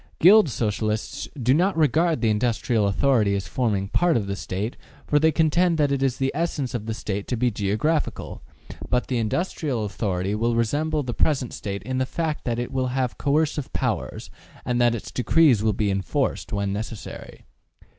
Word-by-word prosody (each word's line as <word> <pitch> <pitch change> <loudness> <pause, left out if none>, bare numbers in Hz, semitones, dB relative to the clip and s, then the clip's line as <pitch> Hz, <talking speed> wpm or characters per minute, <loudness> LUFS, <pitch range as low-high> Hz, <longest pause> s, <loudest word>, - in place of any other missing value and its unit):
Guild 195 0 +7
Socialists 110 -2 -2
do 125 +1 +3
not 180 +4 +2
regard 160 +2 +2
the 115 -2 +3
industrial 110 -1 +1
authority 105 -1 +2
as 95 -4 -3
forming 100 0 -1
part 170 - +2
of 105 - -1
the 100 0 -3
State, 100 +4 -4 0.3
for 150 - +3
they 160 +1 +4
contend 165 +2 +2
that 145 -2 +2
it 140 -1 0
is 130 -2 +1
the 135 0 0
essence 150 -5 -2
of 110 -3 -4
the 110 - -2
State 100 -2 -4
to 125 - -1
be 125 +1 +1
geographical; 110 +10 -1 0.5
but 125 0 +1
the 125 -2 -1
industrial 125 - -1
authority 95 -2 -2
will 115 +2 0
resemble 145 +7 0
the 125 -2 -4
present 130 -2 0
State 100 -2 -5
in 130 +3 -2
the 130 - 0
fact 160 -1 -3
that 120 -2 -1
it 120 0 -3
will 130 -1 0
have 125 -1 -2
coercive 145 -1 0
powers, - - -3 0.3
and 125 -1 0
that 120 -1 +4
its 110 - -7
decrees 130 -1 +4
will 110 0 +2
be 105 0 0
enforced, 95 -2 -1
when 100 -1 -1
necessary. 110 +1 -7
125 Hz, 185 wpm, -24 LUFS, 105-150 Hz, 0.5 s, Guild